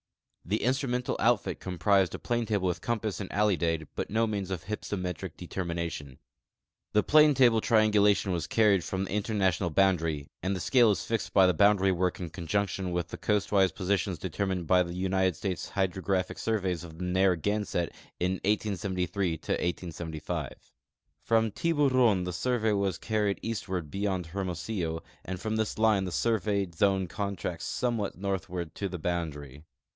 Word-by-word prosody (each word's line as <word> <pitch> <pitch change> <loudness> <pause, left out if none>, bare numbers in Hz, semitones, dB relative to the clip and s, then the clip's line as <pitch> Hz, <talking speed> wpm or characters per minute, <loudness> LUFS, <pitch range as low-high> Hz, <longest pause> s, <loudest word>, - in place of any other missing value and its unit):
The 105 +5 -1
instrumental 125 -1 0
outfit 105 -6 +1
comprised 95 +1 +1
a - - -4
planetable 115 -4 -1
with 90 - -2
compass 110 -4 -2
and 95 - -5
alidade, 85 -6 +1
but - - -3
no 115 +2 +2
means 100 -4 -3
of 95 -4 -4
h3"psometric 90 -4 -4
determination. 85 -6 -4 0.8
The 105 - +4
planetable 135 -7 +5
triangulation 105 -3 +3
was 85 -2 -2
carried 105 -5 +3
from 95 0 -2
the - - -8
international 100 -4 +1
boundaiy, 80 -5 +1
and 95 +2 -1
the - - -3
scale 120 +4 +4
is 95 -7 0
fixed 115 -1 -2
by 95 -2 +6
the 90 - +4
boundary 100 +1 +4
work 90 0 0
in 85 -4 -5
con 85 -2 -7
junction 95 0 -1
with 85 0 -2
the - - -6
coastwise 100 -3 +2
positions 95 0 -1
determined 95 +1 -2
by 90 +3 +4
the 85 -1 -3
United 95 -1 +1
States 95 +1 -4
Hydrographic 95 -1 -1
surveys 95 -6 -1
of 80 -2 -10
the 90 - -4
Narragamett 95 0 +1 0.3
in 90 +1 -1
1873 95 -4 -1 0.5
75. 80 -1 -4 0.7
From 115 -1 +2
Tihuron 130 - +2
the 90 - -3
surve.v 110 +4 0
Avas 100 -4 0
carried 105 -2 0
eastward 95 -8 -3
beyond 95 -3 -1
Hermo 90 +2 -3
sillo, 85 -4 -3 0.2
and 95 0 -5
from 110 +3 -2
this 110 -1 -1
line 110 -3 +3
the 90 - -4
survejmd 100 -2 0
zone 95 +2 +2
contracts 100 -2 -4
somewhat 115 -5 -1
northward 90 -3 -3
to 100 - -3
the 90 -1 -5
boundaiy. 75 -5 -4
95 Hz, 155 wpm, -29 LUFS, 90-105 Hz, 0.8 s, by